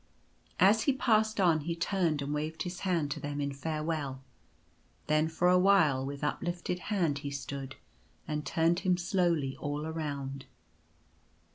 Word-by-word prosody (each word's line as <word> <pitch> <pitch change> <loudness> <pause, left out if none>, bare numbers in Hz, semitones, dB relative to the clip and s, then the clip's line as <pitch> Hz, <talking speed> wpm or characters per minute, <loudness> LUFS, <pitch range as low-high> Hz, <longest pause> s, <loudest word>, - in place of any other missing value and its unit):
As 210 +4 +5
he 280 - +4
passed 220 -4 +2
on 170 -4 +4
he 165 +3 -3
turned 170 -4 0
and 145 +1 -3
waved 155 +2 -3
his 180 0 -5
hand 170 -6 0
to - - -3
them 145 0 -4
in 140 -1 -2
farewell. 150 -2 -3 0.8
Then 155 +1 +2
for 165 +2 +1
a 180 0 +5
while 175 -9 +4
with 140 +1 -5
uplifted 175 +3 -2
hand 170 -9 +1
he 140 0 -5
stood, 140 -1 -6 0.5
and 150 -1 -2
turned 165 +3 +2
him 180 -1 +2
slowly 175 -6 +1
all 145 +1 -3
around. 140 -4 -4
160 Hz, 150 wpm, -31 LUFS, 145-180 Hz, 0.8 s, As